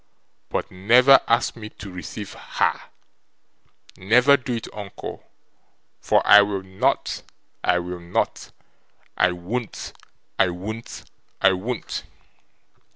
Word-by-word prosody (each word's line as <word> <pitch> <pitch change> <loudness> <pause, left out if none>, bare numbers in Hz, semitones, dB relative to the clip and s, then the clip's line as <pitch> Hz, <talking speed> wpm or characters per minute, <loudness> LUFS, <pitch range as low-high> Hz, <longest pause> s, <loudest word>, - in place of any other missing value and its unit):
But - - -3
never 120 +9 +6
ask 115 +1 +2
me 110 -2 -8
to 105 -2 -10
receive 95 +3 -7
HER, - - -1 1.2
never 120 +9 +5
do 130 -3 -3
it, 115 - -5
uncle. 100 -2 -8 0.7
For - - +2
I 105 +1 +9
will 100 -2 -2
not, 95 0 -1 0.4
I 90 - +3
will 90 0 -4
not, 85 0 -2 0.7
I 90 - +3
won't, 100 +7 -5 0.5
I 90 - +4
won't, 105 +6 -7 0.4
I 95 - +5
won't! 110 +7 -4
100 Hz, 110 wpm, -23 LUFS, 90-115 Hz, 1.2 s, I